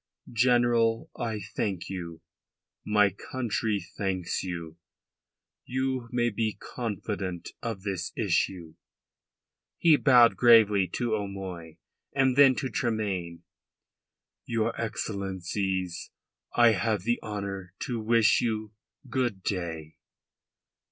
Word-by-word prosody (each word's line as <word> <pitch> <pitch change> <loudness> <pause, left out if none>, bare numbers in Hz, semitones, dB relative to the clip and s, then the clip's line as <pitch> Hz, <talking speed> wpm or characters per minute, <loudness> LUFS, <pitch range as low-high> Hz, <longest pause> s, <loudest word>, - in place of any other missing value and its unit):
"General, 120 -1 +3
I 110 -2 -3 0.2
thank 95 -4 -2
you. 85 -4 -6 0.6
My 105 -1 +3
country 110 0 -2
thanks 95 0 -3
you. 85 -3 -6 0.9
You 130 -1 -2
may 120 -1 +1
be 110 0 -1
confident 100 -6 -4
of 110 -5 -4
this 95 -3 -3
issue." 90 -4 0 1.0
He 160 -3 +5
bowed 125 -5 +6
gravely 110 -5 +6
to 120 -2 -1
O'Moy 95 -6 -5 0.4
and 135 -2 +3
then 135 -2 +7
to 130 -1 -2
Tremayne. 95 -8 -2 1.0
"Your 115 0 0
Excellencies, 95 -4 -3 0.5
I 120 -1 +7
have 105 -1 0
the 120 +3 +1
honour 100 -3 -5
to 120 -4 -2
wish 110 -3 +4
you 110 -2 -2 0.3
good 120 -7 -1
day." 80 -5 -4
105 Hz, 100 wpm, -28 LUFS, 95-120 Hz, 1.0 s, then